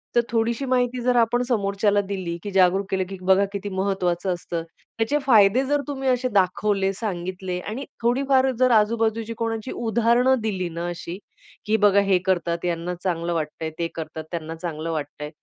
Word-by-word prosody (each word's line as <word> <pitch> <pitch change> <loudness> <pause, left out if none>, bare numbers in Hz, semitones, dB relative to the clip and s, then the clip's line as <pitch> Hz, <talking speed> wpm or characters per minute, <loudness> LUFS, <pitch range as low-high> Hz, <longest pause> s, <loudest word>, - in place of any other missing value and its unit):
तर 240 - +6
थोडीशी 230 +3 0
माहिती 250 -1 +1
जर 250 +1 +2
आपण 235 +1 +3
समोरच्याला 205 -2 +2
दिली 185 -4 -3
की 205 - -5
जागरूक 190 +1 +3
केलं, 190 -1 +1
की 195 - -6
बघा 190 +2 +4
किती 200 0 -4
महत्वाचं 190 -1 0
असतं. 170 -1 -4 0.3
त्याचे 275 +7 +1
फायदे 225 -1 +5
जर, 290 +2 +1
तर 285 - -3
तुम्ही 270 -2 -2
असे 255 0 +1
दाखवले, 195 +1 +2
सांगितले 185 -2 -4
आणि 230 +9 -5 0.2
थोडीफार 265 +2 +3
जर 255 -1 +4
आजूबाजूची 225 +1 +2
कोणाची 225 0 -3
उदाहरण 235 +3 +2
दिली 190 -5 -2
ना 170 +1 -4
अशी, 175 +1 -6 0.5
की 215 +1 +2
बघा 200 0 +5
हे 185 - +5
करतात 175 -2 0
यांना 175 +1 -2
चांगलं 170 -2 -1
वाटतंय, 160 0 -3
ते 170 - 0
करतात 160 -1 -6
त्यांना 165 -1 -4
चांगलं 165 -1 -4
वाटतंय. 150 -1 -5
200 Hz, 170 wpm, -24 LUFS, 175-230 Hz, 0.5 s, तर